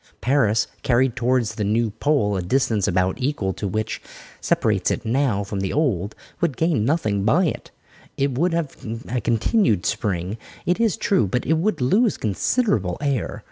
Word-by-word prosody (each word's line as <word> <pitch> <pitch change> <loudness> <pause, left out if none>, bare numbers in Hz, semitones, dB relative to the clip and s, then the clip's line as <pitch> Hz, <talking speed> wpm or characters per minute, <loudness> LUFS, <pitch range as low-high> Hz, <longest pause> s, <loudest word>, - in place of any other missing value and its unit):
Paris, 115 -5 +2 0.2
carried 125 0 +2
towards 125 -3 +1
the 110 -1 -3
new 110 +2 +1
pole 105 -5 +1
a 95 - -1
distance 105 +1 +1
about 95 +6 0
equal 125 -8 -1
to 100 - -4
that - - -4
which 110 +2 -2 0.4
separates - - +1
it - - -2
now 115 -4 +1
from 100 0 -4
the 95 0 -2
old 110 - 0
one, - - -22 0.2
would 160 -8 0
gain 160 -9 +1
nothing 110 -8 0
by 155 - +3
it. 155 - -3 0.5
It 140 0 +1
would 170 +7 +1
have 165 -4 -2 0.3
a 125 0 -2
continued 115 - +1
Spring, 95 +1 -2 0.3
it 180 +4 +1
is 225 -6 +2
true, 195 - +2
but 125 +7 -1
it 160 - +2
would 210 -3 0
lose 205 - +3
considerable 105 - 0
air. 140 -5 -2
120 Hz, 180 wpm, -22 LUFS, 105-150 Hz, 0.5 s, by